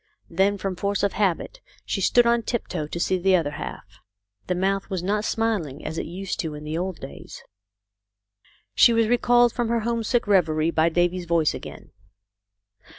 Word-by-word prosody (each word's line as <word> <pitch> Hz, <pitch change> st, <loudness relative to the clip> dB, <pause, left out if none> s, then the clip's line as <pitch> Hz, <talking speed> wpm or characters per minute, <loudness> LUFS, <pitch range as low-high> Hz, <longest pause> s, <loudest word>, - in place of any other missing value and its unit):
Then 195 Hz, +4 st, +2 dB
from 195 Hz, -1 st, -3 dB
force 200 Hz, +2 st, -1 dB
of 200 Hz, -, +1 dB
habit 210 Hz, -, -1 dB, 0.2 s
she -, -, -2 dB
stood 240 Hz, -1 st, +4 dB
on 235 Hz, 0 st, +3 dB
tiptoe 185 Hz, -9 st, -3 dB
to 170 Hz, -, -5 dB
see 185 Hz, +2 st, +1 dB
the 190 Hz, +1 st, +3 dB
other 160 Hz, -5 st, 0 dB
half. 100 Hz, -8 st, -8 dB, 0.5 s
The 180 Hz, -, 0 dB
mouth 195 Hz, +2 st, -1 dB
was 185 Hz, -3 st, -3 dB
not 205 Hz, +3 st, 0 dB
smiling 205 Hz, -13 st, -2 dB
as 160 Hz, -, -3 dB
it -, -, -4 dB
used 185 Hz, +3 st, -5 dB
to 160 Hz, -5 st, -3 dB
in 150 Hz, -, -9 dB
the 155 Hz, +1 st, -4 dB
old 180 Hz, 0 st, -3 dB
days. 135 Hz, -, -10 dB, 1.3 s
She 235 Hz, -, +6 dB
was 230 Hz, -1 st, +3 dB
recalled 240 Hz, 0 st, +4 dB
from 240 Hz, -2 st, -1 dB
her 235 Hz, -1 st, +1 dB
homesick 235 Hz, +1 st, 0 dB
reverie 165 Hz, -5 st, +2 dB
by 165 Hz, 0 st, +2 dB
Davy's 175 Hz, +1 st, 0 dB
voice 165 Hz, -2 st, +2 dB
again. -, -, -10 dB
190 Hz, 175 wpm, -24 LUFS, 165-220 Hz, 1.3 s, She